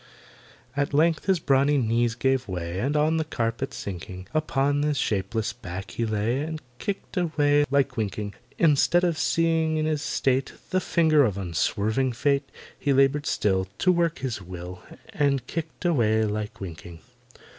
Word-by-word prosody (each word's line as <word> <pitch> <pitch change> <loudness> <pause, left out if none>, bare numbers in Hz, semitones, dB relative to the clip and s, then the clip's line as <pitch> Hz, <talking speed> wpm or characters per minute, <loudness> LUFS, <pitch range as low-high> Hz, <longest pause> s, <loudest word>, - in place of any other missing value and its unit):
At 140 0 0
length 160 +1 +3
his 190 -2 +3
brawny 140 -1 +3
knees 115 -1 +1
gave 130 0 +1
way, 90 -1 -4
And 140 +7 0
on 155 +2 +2
the 160 - +1
carpet 115 -3 -2
sinking, 95 0 -7
Upon 145 -2 +1
his 150 -1 0
shapeless 110 0 -1
back 95 +2 -7
he 115 - -2
lay 110 +4 0
And 160 +1 -4 0.2
kicked 200 0 -5
away 145 -4 +3
like 135 -2 +1
winking. 105 -1 -3 0.2
Instead 165 +2 +4
of 170 -3 +1
seeing 165 -1 +2
in 155 - 0
his 155 -2 0
state 135 -3 0 0.2
The 185 - +2
finger 160 -4 +4
of 105 -6 0
unswerving 105 +7 0
Fate, 140 +3 0 0.3
He 140 - +1
laboured 135 +2 +3
still 95 -2 +1
To 185 - +3
work 170 -2 +1
his 125 -6 -4
will, 90 0 -8 0.3
And 140 - +1
kicked 165 +1 -6
away 110 -10 +3
like 105 0 -4
winking. 85 -2 -8
135 Hz, 155 wpm, -25 LUFS, 105-155 Hz, 0.3 s, Instead